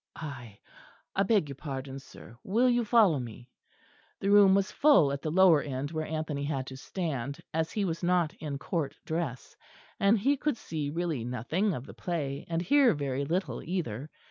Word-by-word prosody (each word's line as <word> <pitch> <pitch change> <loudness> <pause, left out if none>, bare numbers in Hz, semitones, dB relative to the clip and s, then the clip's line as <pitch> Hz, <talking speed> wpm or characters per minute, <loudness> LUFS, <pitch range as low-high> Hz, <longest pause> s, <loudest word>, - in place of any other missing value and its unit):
I 125 -9 -8 0.6
I 195 - +2
beg 200 -5 +3
your 140 - -7
pardon, 135 -2 -6
sir, 120 -3 -14
will 230 +6 +2
you 240 0 +2
follow 210 - +4
me?" 120 +1 -9 0.7
The 200 - 0
room 200 -2 +7
was 195 0 +1
full 280 - +5
at 140 0 -3
the 155 - -2
lower 175 -2 +6
end 140 +1 -4
where 155 -1 -3
Anthony 155 -2 -3
had 140 -3 -2
to - - -8
stand, 140 -4 -4
as 160 0 0
he 205 -2 0
was 170 -2 -3
not 175 -3 +2
in 150 -3 -4
Court 155 -1 -3
dress; 160 -6 -4 0.4
and 200 +3 +4
he 275 +8 +2
could 295 -3 -1
see 150 -7 -4
really 165 -5 -2
nothing 155 - -1
of 125 - -6
the - - -11
play, 145 -6 -4
and 165 0 -1
hear 265 - +4
very 140 -1 -2
little 180 +6 -2
either. 150 - -4
160 Hz, 185 wpm, -29 LUFS, 140-190 Hz, 0.7 s, room